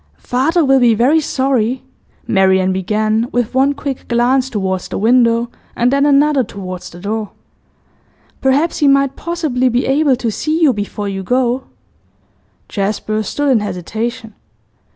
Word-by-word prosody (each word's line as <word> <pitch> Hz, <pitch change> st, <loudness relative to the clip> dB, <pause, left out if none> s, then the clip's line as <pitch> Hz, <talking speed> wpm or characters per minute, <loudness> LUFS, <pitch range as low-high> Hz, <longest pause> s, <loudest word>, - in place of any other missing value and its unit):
'Father 305 Hz, +7 st, 0 dB
will 270 Hz, 0 st, +4 dB
be 240 Hz, -3 st, +4 dB
very 260 Hz, +8 st, +3 dB
sorry,' 260 Hz, -3 st, 0 dB, 0.4 s
Marian 190 Hz, -3 st, +2 dB
began, 215 Hz, +4 st, 0 dB
with 245 Hz, -1 st, -1 dB
one 270 Hz, +2 st, +3 dB
quick 280 Hz, -2 st, -5 dB
glance 250 Hz, +2 st, +1 dB
towards 190 Hz, -5 st, -2 dB
the -, -, -5 dB
window 235 Hz, +1 st, +2 dB, 0.2 s
and 245 Hz, +2 st, +1 dB
then 280 Hz, +1 st, +3 dB
another 285 Hz, -1 st, +3 dB
towards 185 Hz, -4 st, -8 dB
the 175 Hz, -, -12 dB
door. 210 Hz, +2 st, -3 dB, 1.1 s
'Perhaps 280 Hz, +5 st, +1 dB
he 295 Hz, -, +3 dB
might 275 Hz, -1 st, +3 dB
possibly 310 Hz, -7 st, -1 dB
be 245 Hz, +1 st, 0 dB
able 275 Hz, 0 st, +2 dB
to 235 Hz, -2 st, -2 dB
see 310 Hz, +8 st, -2 dB
you 305 Hz, -6 st, +4 dB
before 205 Hz, -1 st, -4 dB
you 195 Hz, -1 st, -4 dB
go?' 250 Hz, +4 st, 0 dB, 1.0 s
Jasper 215 Hz, +1 st, -2 dB
stood 285 Hz, +7 st, -1 dB
in 245 Hz, -, +4 dB
hesitation. 215 Hz, +4 st, -5 dB
245 Hz, 145 wpm, -16 LUFS, 215-270 Hz, 1.1 s, will